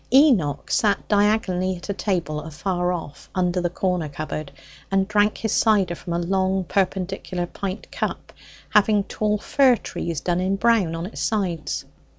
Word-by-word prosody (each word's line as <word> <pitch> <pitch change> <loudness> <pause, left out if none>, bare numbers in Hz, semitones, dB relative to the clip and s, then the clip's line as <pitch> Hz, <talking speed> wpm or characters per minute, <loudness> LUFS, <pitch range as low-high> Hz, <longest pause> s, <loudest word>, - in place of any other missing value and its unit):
Enoch 245 - +4
sat 205 -2 +2
diagonally 205 -3 +2
at 175 - -10
a 200 - -1
table 175 -7 -1
afar 175 +3 -2
off, 165 -5 -6
under 180 -1 +1
the 175 - 0
corner 180 -3 -1
cupboard, 155 0 -5 0.4
and 195 0 +2
drank 210 0 +2
his 220 - -2
cider 200 -6 +3
from 175 0 -6
a - - +1
long 190 +2 +1
perpendicular 185 -1 -1
pint 190 +3 -6
cup, - - -4 0.4
having 210 -1 +4
tall 210 +1 -1
fir 260 +4 +4
trees 170 -7 -4
done 175 0 0
in 190 +2 +1
brown 200 -6 +2
on 165 +1 -4
its 200 - -7
sides. 185 -8 -1
185 Hz, 160 wpm, -23 LUFS, 175-205 Hz, 0.4 s, Enoch